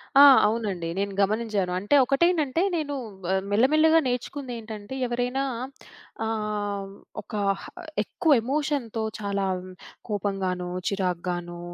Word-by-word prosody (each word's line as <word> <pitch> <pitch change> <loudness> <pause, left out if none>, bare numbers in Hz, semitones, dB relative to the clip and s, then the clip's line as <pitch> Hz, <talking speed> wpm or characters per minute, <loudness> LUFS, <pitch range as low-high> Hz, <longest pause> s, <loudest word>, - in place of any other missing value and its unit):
ఆ! 275 - +9 0.3
అవునండి. 205 -6 -2
నేను 200 0 -1
గమనించాను. 205 -2 0
అంటే, 205 +9 +2
ఒకటేంటంటే, 320 +1 +2
నేనూ 295 -3 -2 0.4
ఆహ్, 190 0 +1
మెల్ల 215 +5 +5
మెల్లగా 320 +1 +6
నేర్చుకుందేంటంటే, 240 -4 -5
ఎవరైనా 245 +2 -1 0.8
ఆహ్, 210 -2 -2 0.3
ఒక 205 - -17 0.7
ఎక్కువ 320 - 0
ఎమోషన్‌తో 270 -4 -1 0.2
చాలా 200 -1 -1 0.6
కోపంగానో, 190 -3 -2 0.2
చిరాకుగానో 175 -2 -2
215 Hz, 95 wpm, -26 LUFS, 195-265 Hz, 0.8 s, ఆ